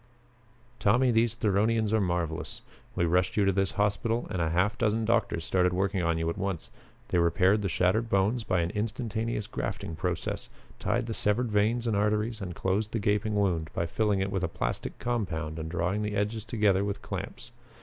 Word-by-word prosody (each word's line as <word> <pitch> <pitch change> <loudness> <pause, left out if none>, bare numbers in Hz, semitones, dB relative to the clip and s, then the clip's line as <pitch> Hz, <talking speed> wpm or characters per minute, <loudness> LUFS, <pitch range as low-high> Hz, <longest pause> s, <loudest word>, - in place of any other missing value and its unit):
"Tommy, 120 +5 +4
these 115 0 +2
Theronians 110 0 +1
are 110 - +3
marvelous. 85 -3 -2 0.3
We 85 - +2
rushed 90 +4 +1
you 100 - +4
to 95 - +4
this 95 0 0
hospital 105 +3 0
and 90 - -1
a 80 - +1
half 90 +6 +2
dozen 110 -1 +1
doctors 110 -7 +1
started 90 -1 +2
working 95 +1 0
on 85 -1 +1
you 80 0 -1
at 90 - -7
once. 95 -4 -3 0.4
They 90 - +2
repaired 95 +4 +3
the 100 - -1
shattered 95 +6 +1
bones 105 +5 +2
by 90 -4 +1
an 85 - -1
instantaneous 110 0 -2
grafting 80 - -4
process, 90 0 -3 0.3
tied 120 0 0
the 115 - -3
severed 110 +3 0
veins 110 +4 +2
and 115 -3 +1
arteries 105 +2 0
and 90 -3 -5
closed 105 +3 -1
the - - +1
gaping 105 +1 +1
wound 90 -6 +1
by 85 - 0
filling 105 +2 +1
it 95 0 -1
with 95 -2 -1
a - - +2
plastic - - -3
compound 85 -10 -2
and 80 0 -4
drawing 90 +4 -1
the 105 -1 -2
edges 105 +2 -1
together 105 -4 +2
with 100 -1 -3
clamps. - - -6
100 Hz, 190 wpm, -29 LUFS, 90-110 Hz, 0.4 s, Tommy